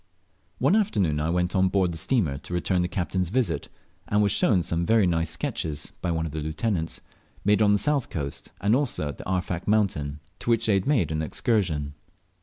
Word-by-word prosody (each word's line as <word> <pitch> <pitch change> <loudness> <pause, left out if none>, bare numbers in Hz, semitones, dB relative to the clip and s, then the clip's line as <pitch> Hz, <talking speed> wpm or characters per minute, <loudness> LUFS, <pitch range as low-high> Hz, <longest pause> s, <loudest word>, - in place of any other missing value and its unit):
One - - +3
afternoon 100 - +1
I 75 +2 0
went 90 +2 0
on 95 0 +4
board 95 -2 +2
the 85 - -4
steamer 80 - +1
to 90 - -9
return 90 +1 +1
the 90 - 0
captain's 90 0 -1
visit, 105 - -1 0.4
and 105 0 +2
was 100 - +2
shown 95 -2 +3
some 85 +1 -1
very 110 +2 +4
nice 85 -2 +1
sketches 75 -2 -3
(by 90 - -1
one 80 -1 0
of 80 - -5
the 80 +1 -4
lieutenants), 80 +2 -2 0.4
made 105 +1 +4
on 105 -1 +5
the - - +4
south 145 +2 +1
coast, 70 -7 -5
and 105 +4 +3
also 125 - -1
at 70 - -8
the - - -7
Arfak 90 -1 -2
mountain, 90 -9 +1 0.2
to - - -4
which 115 -1 +3
they 110 - +3
had 95 +3 +1
made 120 - +2
an 80 0 -1
excursion. 80 - 0
90 Hz, 210 wpm, -26 LUFS, 80-105 Hz, 0.4 s, on